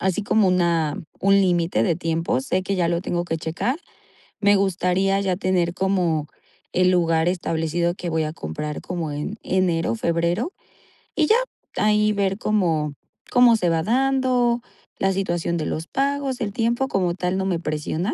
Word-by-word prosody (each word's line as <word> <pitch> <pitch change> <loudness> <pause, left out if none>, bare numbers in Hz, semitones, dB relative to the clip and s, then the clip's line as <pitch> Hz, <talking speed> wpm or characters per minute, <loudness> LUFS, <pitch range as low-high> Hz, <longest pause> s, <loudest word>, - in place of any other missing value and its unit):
así 190 +1 0
como 205 -1 +3
una 170 -4 +1 0.2
un 195 0 +4
límite 175 - +2
de 160 +7 +1
tiempo. 165 -5 -1
Sé 185 +7 -1
que 195 +1 -2
ya 175 -2 +1
lo 170 0 0
tengo 175 -1 -2
que 165 -2 -2
checar. 170 - -2 0.6
Me 205 -1 +4
gustaría 195 0 +1
ya 190 -2 0
tener 180 -3 0
como 180 -6 0 0.5
el 185 0 +3
lugar 165 -2 +2
establecido 170 -1 -1
que 175 -2 -5
voy 160 -1 0
a 155 - -3
comprar 150 - -5
como 170 -4 -4
en 150 +9 -4
enero, 170 -9 +1
febrero, 170 - 0 0.6
y 310 -3 +2
ya. 450 - +5 0.4
Ahí 210 0 +3
ver 195 -1 0
cómo 165 -10 0 0.4
cómo 245 -2 +6
se 180 -5 +1
va 165 -1 +1
dando 250 0 +2 0.4
la 195 0 +2
situación 175 -3 -1
de 155 - -2
los 160 +2 -3
pagos, 275 -1 -1
el 210 -5 -3
tiempo 235 +4 0
como 180 -7 0
tal 180 0 -1
no 190 - -1
me 185 -3 0
presiona, 155 +4 -2
180 Hz, 170 wpm, -23 LUFS, 165-205 Hz, 0.6 s, cómo